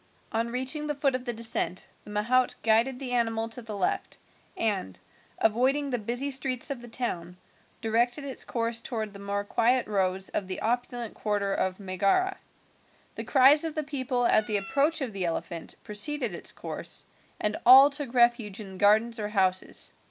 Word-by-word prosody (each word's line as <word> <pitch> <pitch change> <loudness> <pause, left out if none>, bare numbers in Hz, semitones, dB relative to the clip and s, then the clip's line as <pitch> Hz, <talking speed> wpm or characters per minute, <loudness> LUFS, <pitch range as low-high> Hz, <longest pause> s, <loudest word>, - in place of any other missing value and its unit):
On 230 +1 0
reaching 260 +5 -2
the 295 - -1
foot 275 -1 +1
of 255 0 -3
the 240 - -1
descent 225 -5 -2 0.2
the - - -11
mahout 235 +5 +2
guided 230 +4 +3
the 255 -1 -6
animal 225 -2 0
to 235 +2 -8
the 220 -3 -7
left, 185 - -1 0.4
and, 195 - -1 0.4
avoiding 265 +6 +2
the 245 - 0
busy 245 +6 -2
streets 265 0 -1
of 265 -3 -4
the 240 - -10
town, 180 -8 -4 0.4
directed 240 +5 +1
its 270 - -4
course 230 -1 -1
towards 220 -4 -4
the 200 - -10
more 200 0 -2
quiet 240 +4 +2
roads 190 -2 0
of 190 - -3
the 185 - -4
opulent 240 0 -2
quarter 205 -2 -1
of 185 0 -1
Megara. 200 - +1 0.7
The - - -5
cries 275 +3 +5
of 320 -2 -4
the 310 - -1
people 260 -4 -1
at 215 -2 +3
the 210 - +1
approach 285 +10 +1
of 250 -5 -3
the 190 -2 -2
elephant 165 0 -4
preceded 240 +1 -2
its 170 - -2
course, - - -3 0.3
and 210 0 0
all 270 +3 +9
took 280 -3 -4
refuge 235 -4 +3
in 190 -3 -8
gardens 220 +3 +4
or 210 -1 -2
houses. 190 -3 0
230 Hz, 175 wpm, -28 LUFS, 205-255 Hz, 0.7 s, all